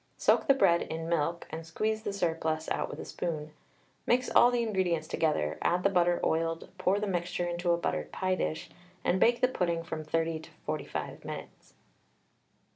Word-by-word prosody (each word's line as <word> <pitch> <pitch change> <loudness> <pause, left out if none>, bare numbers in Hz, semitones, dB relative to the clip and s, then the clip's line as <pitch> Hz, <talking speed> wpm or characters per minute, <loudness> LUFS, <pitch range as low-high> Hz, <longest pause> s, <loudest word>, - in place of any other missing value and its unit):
Soak - - +3
the 275 - +6
bread 170 -10 +4
in 165 0 -4
milk, 170 0 0
and 160 +1 -5
squeeze 215 +7 -1
the 205 - -3
surplus 160 -4 -1
out - - -1
with - - -7
a - - -6
spoon. 155 -3 -4 0.6
Mix 250 +1 +2
all 240 - +7
the 245 -1 +1
ingredients 180 -7 0
together, 80 - 0
add 180 +1 +1
the 195 - +3
butter 175 -1 +3
oiled, 165 0 0
pour 185 +2 +2
the 210 - -1
mixture 175 -2 -1
into 175 0 -2
a 170 - +3
buttered 170 - -2
pie 185 -1 0
dish, 160 -3 -2 0.3
and 185 - +2
bake 235 +3 +4
the 255 - +6
pudding 170 -8 -1
from 160 -1 -5
30 165 +1 0
to 160 - -13 0.2
45 155 0 -4
minutes. - - -9
170 Hz, 185 wpm, -30 LUFS, 160-190 Hz, 0.6 s, all